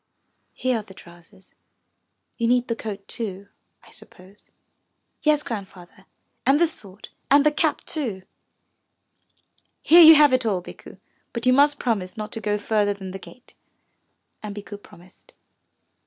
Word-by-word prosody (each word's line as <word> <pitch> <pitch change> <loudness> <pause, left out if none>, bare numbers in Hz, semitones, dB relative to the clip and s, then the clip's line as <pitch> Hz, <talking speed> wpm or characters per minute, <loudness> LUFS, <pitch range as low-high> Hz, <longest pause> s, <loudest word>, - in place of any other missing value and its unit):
Here 255 -3 -1
are - - -6
the 190 -2 -16
trousers. 175 +2 -18 0.8
You 230 - -1
need 245 +1 +2
the 230 - -1
coat 210 -3 -8
too, 200 -3 -6 0.3
I - - -19
suppose." 190 +3 -17 0.7
"Yes, 300 -1 +2
Grandfather, 190 -4 -9 0.4
and 270 +3 +3
the 340 - +5
sword, 205 - -11 0.2
and 285 +1 +5
the 300 - +4
cap 310 0 -1
too." 230 - -5 1.6
"Here 345 +2 +7
you 320 -1 +10
have 295 -3 +5
it 255 0 +2
all, 205 -5 0
Bikku, - - -13 0.4
but 235 0 -3
you 255 - +5
must 285 +2 +4
promise 215 -6 -3
not 215 -1 -6
to 225 - -6
go 210 -1 -1
further 205 -1 0
than 190 -1 -9
the 195 - -8
gate." 250 +6 -16 0.9
And 210 -1 -7
Bikku 205 0 -9
promised. 180 -1 -19
215 Hz, 150 wpm, -23 LUFS, 195-260 Hz, 1.6 s, you